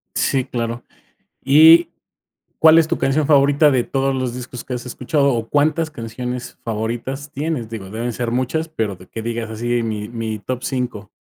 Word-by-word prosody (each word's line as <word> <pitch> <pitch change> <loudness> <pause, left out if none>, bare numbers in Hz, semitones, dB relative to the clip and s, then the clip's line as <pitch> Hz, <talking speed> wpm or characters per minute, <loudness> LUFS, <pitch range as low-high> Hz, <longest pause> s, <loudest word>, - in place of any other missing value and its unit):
Sí, 130 -2 +1
claro. 115 0 -4 0.6
Y, 160 +5 +7 0.7
¿cuál 160 0 +7
es 160 -1 +3
tu - - -1
canción 140 +2 +1
favorita 145 +1 +5
de 125 -3 +1
todos 135 0 0
los 130 -2 -2
discos 125 -1 -7
que 125 - -5
has 125 - -5
escuchado? 140 +2 0
O, 115 -1 -2
¿cuántas 155 +2 +1
canciones 125 -1 -6
favoritas 120 +6 -4
tienes? 145 -5 -3
Digo, 100 -4 -7
deben 115 +3 -3
ser 120 +1 -3
muchas, 130 +6 -1
pero 110 - -3
de 90 - -15
que 115 - -6
digas 115 -1 -4
así: 120 +2 -1
"Mi 105 -2 -3
mi 115 -2 -4
top 125 +5 -4
5". 125 -6 -3
125 Hz, 175 wpm, -20 LUFS, 115-140 Hz, 0.7 s, Y